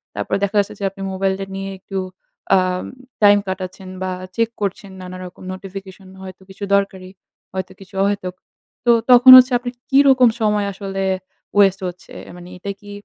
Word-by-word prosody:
তারপর -, -, -4 dB
দেখা 200 Hz, +1 st, -1 dB
যাচ্ছে 200 Hz, -, -1 dB
যে -, -, -6 dB
আপনি 195 Hz, +1 st, -13 dB
মোবাইলটা 190 Hz, 0 st, -1 dB
নিয়ে 195 Hz, 0 st, -5 dB
একটু 195 Hz, +1 st, -7 dB, 0.6 s
আম 185 Hz, -1 st, 0 dB, 0.4 s
টাইম 205 Hz, 0 st, +7 dB
কাটাচ্ছেন 190 Hz, 0 st, -6 dB
বা 185 Hz, -, -2 dB, 0.2 s
চেক 230 Hz, 0 st, +1 dB
করছেন 200 Hz, 0 st, -3 dB
নানা 185 Hz, 0 st, -8 dB
রকম 180 Hz, +1 st, -12 dB
নোটিফিকেশন 190 Hz, 0 st, -10 dB
হয়তো 185 Hz, 0 st, -10 dB
কিছু 190 Hz, +1 st, -10 dB
দরকারি, 190 Hz, -2 st, -2 dB, 0.4 s
হয়তো 190 Hz, 0 st, -4 dB
কিছু 195 Hz, 0 st, -15 dB
অহেতুক। 200 Hz, -2 st, -2 dB, 0.5 s
তো 240 Hz, -, +6 dB, 0.2 s
তখন 250 Hz, +1 st, +9 dB
হচ্ছে, 255 Hz, +1 st, +6 dB
আপনি 245 Hz, 0 st, -5 dB, 0.2 s
কি 270 Hz, -, +5 dB
রকম 255 Hz, -2 st, +6 dB
সময় 210 Hz, -1 st, +1 dB
আসলে 195 Hz, 0 st, -4 dB, 0.5 s
ওয়েস্ট 195 Hz, -2 st, +4 dB
হচ্ছে? 180 Hz, +1 st, -10 dB, 0.2 s
মানে 175 Hz, -, -11 dB
এটা 200 Hz, +2 st, -5 dB
কি 205 Hz, -, -12 dB
195 Hz, 165 wpm, -19 LUFS, 185-205 Hz, 0.6 s, তখন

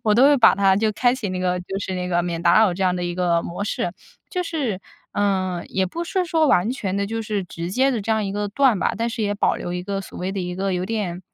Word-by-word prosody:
我 210 Hz, -, +5 dB
都 250 Hz, +4 st, +6 dB
会 290 Hz, 0 st, +6 dB
把 235 Hz, -, +7 dB
它 195 Hz, -1 st, +4 dB
就 215 Hz, +2 st, +1 dB
开 245 Hz, +3 st, +2 dB
启 225 Hz, -6 st, -4 dB
那 185 Hz, -, -3 dB
个 180 Hz, 0 st, 0 dB
就 195 Hz, +2 st, -5 dB
是 190 Hz, -1 st, -4 dB
那 180 Hz, 0 st, -3 dB
个 175 Hz, -1 st, +1 dB
免 170 Hz, -1 st, -3 dB
打 175 Hz, +4 st, +5 dB
扰 215 Hz, -4 st, +4 dB
这 185 Hz, +2 st, -3 dB
样 180 Hz, -1 st, +2 dB
的 180 Hz, -, -2 dB
一 175 Hz, 0 st, -3 dB
个 175 Hz, -2 st, +1 dB
模 175 Hz, +4 st, -5 dB
式。 175 Hz, -4 st, -2 dB, 0.4 s
就 365 Hz, -3 st, -1 dB
是 270 Hz, -, -2 dB, 0.3 s
嗯， 185 Hz, -3 st, 0 dB
也 190 Hz, 0 st, 0 dB
不 335 Hz, -, -4 dB
是 365 Hz, +1 st, 0 dB
说 320 Hz, -2 st, +2 dB
完 180 Hz, +6 st, +3 dB
全 200 Hz, -7 st, -3 dB
地 200 Hz, -, 0 dB
就 225 Hz, +2 st, -3 dB
是 210 Hz, -3 st, -2 dB
直 170 Hz, 0 st, -6 dB
接 265 Hz, +6 st, +3 dB
地 235 Hz, -, -1 dB
这 215 Hz, +3 st, -4 dB
样 220 Hz, -1 st, +1 dB
一 195 Hz, -, -3 dB
个 205 Hz, 0 st, -2 dB
断 245 Hz, -1 st, +3 dB
吧， -, -, 0 dB
但 230 Hz, +2 st, -1 dB
是 225 Hz, -, -3 dB
也 205 Hz, -1 st, 0 dB
保 -, -, +1 dB
留 175 Hz, -, -5 dB
一 180 Hz, -, -3 dB
个 195 Hz, +1 st, -3 dB
所 195 Hz, -, -10 dB
谓 185 Hz, +2 st, -3 dB
的 195 Hz, -, -3 dB
一 180 Hz, 0 st, -4 dB
个 195 Hz, +1 st, -1 dB
有 180 Hz, 0 st, -1 dB
点 195 Hz, -5 st, -3 dB
195 Hz, 310 characters per minute, -22 LUFS, 180-225 Hz, 0.4 s, 把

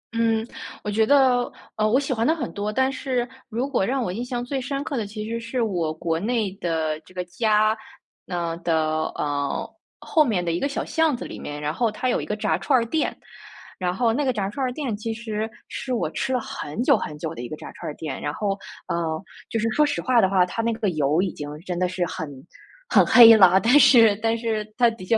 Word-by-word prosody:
嗯， 225 Hz, -1 st, +1 dB, 0.4 s
我 210 Hz, -, -2 dB
觉 220 Hz, +1 st, +2 dB
得， 260 Hz, -3 st, +4 dB, 0.2 s
呃， 215 Hz, 0 st, +1 dB
我 255 Hz, +5 st, +4 dB
喜 280 Hz, -2 st, -1 dB
欢 230 Hz, -1 st, 0 dB
的 320 Hz, -, +3 dB
很 265 Hz, -7 st, -4 dB
多， 205 Hz, +1 st, -2 dB
但 260 Hz, +4 st, +1 dB
是 255 Hz, -3 st, -2 dB, 0.2 s
如 245 Hz, +4 st, -2 dB
果 265 Hz, -8 st, 0 dB
让 260 Hz, +6 st, 0 dB
我 180 Hz, -, -3 dB
印 235 Hz, +4 st, -3 dB
象 245 Hz, -1 st, -3 dB
最 270 Hz, +1 st, -2 dB
深 275 Hz, +2 st, -3 dB
刻 290 Hz, -2 st, -4 dB
的 220 Hz, -4 st, -2 dB
其 215 Hz, +1 st, -6 dB
实 230 Hz, +1 st, -3 dB
是 235 Hz, +1 st, -2 dB
我 175 Hz, -7 st, -1 dB
国 165 Hz, +1 st, -2 dB
内 220 Hz, -1 st, 0 dB
的 160 Hz, -2 st, -1 dB
这 165 Hz, +4 st, -21 dB
个 180 Hz, -1 st, -3 dB
家， 215 Hz, +3 st, +2 dB, 0.5 s
呃， 170 Hz, -2 st, -2 dB
的， 155 Hz, -2 st, 0 dB
呃， 145 Hz, -1 st, -2 dB, 0.3 s
后 310 Hz, -, +3 dB
面 195 Hz, -9 st, 0 dB
的 170 Hz, -, 0 dB
一 170 Hz, -, -1 dB
个 285 Hz, -, -1 dB
小 275 Hz, -, -3 dB
巷 320 Hz, -6 st, +1 dB
子 -, -, -7 dB
里 -, -, -8 dB
面， 145 Hz, 0 st, -6 dB
然 150 Hz, +1 st, -2 dB
后 235 Hz, +3 st, +1 dB
它 250 Hz, +4 st, -2 dB
有 -, -, +1 dB
一 -, -, -5 dB
个 210 Hz, -, -2 dB
炸 -, -, +1 dB
串 270 Hz, -3 st, +3 dB
儿 230 Hz, -, -1 dB
店。 300 Hz, +6 st, -1 dB, 0.6 s
然 180 Hz, -2 st, -1 dB
后 225 Hz, +3 st, +1 dB
那 290 Hz, +4 st, 0 dB
个 260 Hz, -, +2 dB
炸 200 Hz, -4 st, -2 dB
串 265 Hz, +5 st, -2 dB
儿 250 Hz, -, -1 dB
店 250 Hz, -5 st, -3 dB
其 225 Hz, +2 st, -4 dB
实 220 Hz, -1 st, -3 dB, 0.2 s
是 260 Hz, -, -6 dB
我 170 Hz, -10 st, 0 dB
吃 260 Hz, -, -2 dB
了 255 Hz, -, +2 dB
很 200 Hz, -2 st, -5 dB
久 -, -, +4 dB
很 150 Hz, -, -6 dB
久 160 Hz, +1 st, -5 dB
的 -, -, -6 dB
一 120 Hz, -, -6 dB
个 155 Hz, -, -5 dB
炸 -, -, -9 dB
串 -, -, -6 dB
儿 -, -, -8 dB
店， 150 Hz, -5 st, -5 dB
然 145 Hz, -, -2 dB
后， 200 Hz, -2 st, -1 dB, 0.3 s
呃， 160 Hz, -2 st, -2 dB, 0.3 s
就 225 Hz, -, -1 dB
是 225 Hz, +1 st, 0 dB
说 300 Hz, +7 st, +3 dB
实 290 Hz, -, -1 dB
话 250 Hz, -3 st, +3 dB
的 190 Hz, -, +3 dB
话， 185 Hz, -2 st, +4 dB
它 205 Hz, +5 st, -3 dB
那 230 Hz, 0 st, 0 dB
个 220 Hz, -3 st, -1 dB
油 155 Hz, +1 st, +1 dB
已 190 Hz, -, 0 dB
经 145 Hz, -, -6 dB, 0.2 s
真 180 Hz, -1 st, -3 dB
的 180 Hz, 0 st, +1 dB
是 185 Hz, -1 st, -1 dB
很 160 Hz, -, -5 dB, 0.6 s
很 -, -, +5 dB
黑 230 Hz, -2 st, +9 dB
了， 190 Hz, -2 st, +7 dB
但 245 Hz, +7 st, +5 dB
是 235 Hz, -6 st, +7 dB
但 225 Hz, 0 st, +2 dB
是 225 Hz, -2 st, -1 dB
它 240 Hz, -1 st, +5 dB
的 225 Hz, -5 st, -10 dB
确 225 Hz, +4 st, +3 dB
220 Hz, 265 characters per minute, -24 LUFS, 175-245 Hz, 0.6 s, 黑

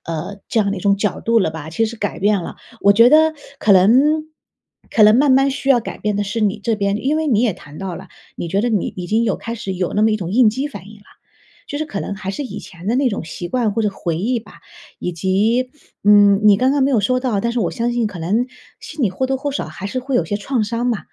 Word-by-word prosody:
呃， 165 Hz, +5 st, -5 dB
这 225 Hz, -, +1 dB
样 200 Hz, -1 st, 0 dB
的 200 Hz, -, -2 dB
一 185 Hz, -, -6 dB
种 200 Hz, +1 st, +2 dB
角 210 Hz, -1 st, -1 dB
度 230 Hz, 0 st, +3 dB
了 190 Hz, -, +1 dB
吧， 160 Hz, 0 st, -8 dB
其 225 Hz, +7 st, 0 dB
实 230 Hz, +1 st, -7 dB
改 205 Hz, -1 st, -3 dB
变 205 Hz, -2 st, +1 dB
了。 -, -, -8 dB, 0.3 s
我 200 Hz, -, +6 dB
觉 230 Hz, +4 st, +6 dB
得 315 Hz, +2 st, +5 dB, 0.3 s
可 205 Hz, -, +3 dB
能 190 Hz, +2 st, +6 dB, 1.0 s
可 220 Hz, -, +3 dB
能 215 Hz, +1 st, +7 dB
慢 275 Hz, +1 st, +4 dB
慢 270 Hz, +1 st, +4 dB
需 275 Hz, 0 st, -2 dB
要 245 Hz, -3 st, +5 dB
改 -, -, -7 dB
变 210 Hz, -1 st, -1 dB
的 205 Hz, -, 0 dB
是 210 Hz, +3 st, -3 dB
你 210 Hz, +1 st, +1 dB
这 225 Hz, +2 st, -1 dB
边， 200 Hz, +1 st, -1 dB
因 285 Hz, +4 st, +1 dB
为 315 Hz, 0 st, -1 dB
你 230 Hz, -7 st, +2 dB
也 230 Hz, -7 st, +1 dB
谈 150 Hz, +1 st, -13 dB
到 190 Hz, -3 st, -5 dB
了， 190 Hz, -1 st, -11 dB, 0.3 s
你 170 Hz, -, -5 dB
觉 195 Hz, +4 st, 0 dB
得 240 Hz, -, 0 dB
你 210 Hz, -5 st, -1 dB
已 180 Hz, -1 st, -5 dB
经 225 Hz, +5 st, +1 dB
有 205 Hz, -, 0 dB
开 230 Hz, 0 st, -6 dB
始 195 Hz, -4 st, -5 dB
有 180 Hz, -1 st, -3 dB
那 210 Hz, -, +2 dB
么 220 Hz, -, +4 dB
一 215 Hz, -, +1 dB
种 180 Hz, -2 st, -5 dB
应 235 Hz, -2 st, +5 dB
激 265 Hz, +6 st, -3 dB
反 200 Hz, -7 st, -10 dB
应 215 Hz, -, -13 dB
啦， 205 Hz, -, -23 dB, 0.6 s
就 285 Hz, -, -4 dB
是 310 Hz, -, -3 dB
可 200 Hz, -9 st, -5 dB
能 -, -, -4 dB
还 195 Hz, -1 st, -5 dB
是 285 Hz, -, -4 dB
以 -, -, -7 dB
前 175 Hz, +1 st, -12 dB
的 235 Hz, -, +1 dB
那 270 Hz, -2 st, +2 dB
种 200 Hz, -6 st, -4 dB
习 175 Hz, +2 st, -7 dB
惯 230 Hz, -1 st, 0 dB
或 225 Hz, -, -1 dB
者 210 Hz, -, +2 dB
回 170 Hz, -4 st, -3 dB
忆 240 Hz, +6 st, 0 dB
吧， -, -, -17 dB, 0.4 s
以 180 Hz, -, -3 dB
及， 210 Hz, +9 st, 0 dB, 0.3 s
嗯， 205 Hz, -1 st, +6 dB
你 205 Hz, -2 st, +7 dB
刚 255 Hz, +4 st, +2 dB
刚 285 Hz, -2 st, +1 dB
没 275 Hz, -, +2 dB
有 230 Hz, -, +3 dB
说 255 Hz, +5 st, +1 dB
到， 240 Hz, -6 st, -1 dB
但 235 Hz, -, -1 dB
是 240 Hz, -, -2 dB
我 175 Hz, -, 0 dB
相 240 Hz, +1 st, -2 dB
信 240 Hz, -2 st, 0 dB
可 195 Hz, -4 st, -7 dB
能 215 Hz, +9 st, 0 dB, 0.3 s
心 305 Hz, -2 st, -6 dB
里 195 Hz, -, +1 dB
或 260 Hz, +8 st, -2 dB
多 265 Hz, 0 st, -1 dB
或 285 Hz, +2 st, -3 dB
少 280 Hz, -, -3 dB
还 175 Hz, +5 st, -7 dB
是 255 Hz, -, -3 dB
会 265 Hz, +1 st, -4 dB
有 165 Hz, -, +1 dB
些 205 Hz, +5 st, -2 dB
创 230 Hz, +2 st, -1 dB
伤 230 Hz, +3 st, -2 dB
嘛， 230 Hz, -4 st, 0 dB
210 Hz, 305 characters per minute, -19 LUFS, 195-245 Hz, 1.0 s, 能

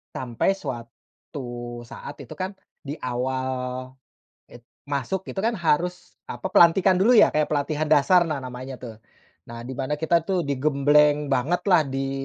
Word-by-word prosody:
sampai, 125 Hz, +8 st, 0 dB
suatu 120 Hz, -3 st, -8 dB
saat 135 Hz, +3 st, -9 dB
itu -, -, -16 dB
kan, 190 Hz, +2 st, -4 dB, 0.2 s
di 145 Hz, +2 st, -6 dB
awal 130 Hz, +1 st, -2 dB, 1.0 s
it 120 Hz, 0 st, -15 dB, 0.2 s
masuk 145 Hz, +7 st, -2 dB
gitu 190 Hz, -, -3 dB
kan, 230 Hz, -, +2 dB
harus, 175 Hz, +2 st, -1 dB
apa, 190 Hz, -, -5 dB
pelantikan 185 Hz, +1 st, +5 dB
dulu, 205 Hz, +7 st, +4 dB
ya, -, -, +8 dB
kayak 150 Hz, -1 st, +2 dB
pelatihan 150 Hz, +1 st, -1 dB
dasar, 165 Hz, +5 st, +5 dB
nah, 155 Hz, -4 st, -3 dB
namanya 130 Hz, 0 st, -8 dB
tuh. 115 Hz, -3 st, -8 dB, 0.5 s
Nah, 115 Hz, 0 st, -8 dB
di 130 Hz, +2 st, -6 dB
mana 135 Hz, +2 st, -2 dB
kita 165 Hz, 0 st, +2 dB
tuh 185 Hz, 0 st, 0 dB
digembleng 145 Hz, +1 st, +3 dB
bangetlah, 160 Hz, +5 st, +2 dB
di, 135 Hz, 0 st, -3 dB
145 Hz, 145 wpm, -24 LUFS, 130-170 Hz, 1.0 s, ya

